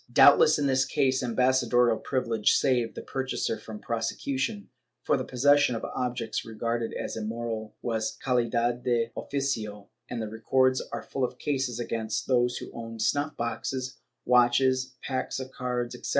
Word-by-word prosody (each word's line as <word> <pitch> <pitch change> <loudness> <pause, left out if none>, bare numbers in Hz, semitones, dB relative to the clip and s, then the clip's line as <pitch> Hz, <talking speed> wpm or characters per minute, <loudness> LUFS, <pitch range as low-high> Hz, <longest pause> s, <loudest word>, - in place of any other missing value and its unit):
^ - - -21
Doubtless 145 +2 +7
in 145 - 0
this 130 -1 +3
case 130 -2 +1
ambassadorial 125 -1 +3
privilege 115 -5 +1
saved 125 -4 +1
the - - -6
pur 135 - -3
chaser 115 -4 -2
from 110 0 -8
prosecution, 205 - -2 0.3
for - - +2
the 130 - -1
possession 140 0 +3
of 115 - -4
objects 120 -2 -3
regarded 115 +1 -2
as - - -4
immoral 110 0 -4
was 110 -2 -2
calidad 120 -1 +1
de 120 -2 +1
oficio, 110 -8 -3 0.2
and 120 - -4
the 110 - -3
records 130 +4 +2
are - - -4
full 135 - -3
of 125 0 -2
cases 135 -5 -1
against 115 -2 -2
those 125 -1 +2
who - - -8
owned 115 -1 -7
snuff 145 +2 0
boxes, 130 +2 -3 0.3
watches, 130 +1 +3
packs 130 0 -2
of 130 0 -6
cards 125 -2 -3
etc. - - -7
125 Hz, 160 wpm, -28 LUFS, 115-130 Hz, 0.3 s, Doubtless